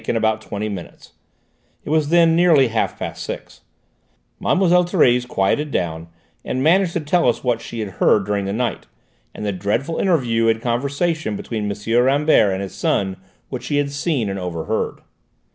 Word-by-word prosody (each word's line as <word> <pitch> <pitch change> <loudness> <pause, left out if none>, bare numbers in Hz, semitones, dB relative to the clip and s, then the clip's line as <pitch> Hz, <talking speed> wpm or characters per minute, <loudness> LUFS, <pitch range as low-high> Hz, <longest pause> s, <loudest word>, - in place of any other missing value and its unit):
In - - 0
about 110 -1 +1
twenty 105 0 -4
minutes 95 -5 -8 0.7
it - - -4
was 155 -2 +2
then 165 -1 +5
nearly 165 -7 +5
half 115 0 -1
past - - -6
six - - -8 0.8
Mlle. - - +1
Thérèse 175 -9 +3
quietened 125 +8 0
down, 80 -2 -2 0.4
and 130 - -2
managed 175 +3 +3
to - - 0
tell 155 -2 +2
us 120 - -2
what 120 -3 0
she 115 - -6
had 105 - -4
heard 100 - +4
during 100 -1 -1
the 100 - -2
night, 120 +3 -2 0.5
and 105 - -5
the 105 - 0
dreadful 105 - -2
interview 120 -11 +2
and 115 0 +2
conversation 140 +2 -1
between 105 -1 -3
M. 115 +4 +1
Rambert 140 -5 +3
and 95 +1 -2
his 95 - -7
son 95 -1 0 0.3
which 130 - -6
she 145 - -1
had 145 -1 0
seen 140 - -1
and 95 0 -3
overheard." 90 +4 -3
120 Hz, 175 wpm, -20 LUFS, 105-155 Hz, 0.8 s, then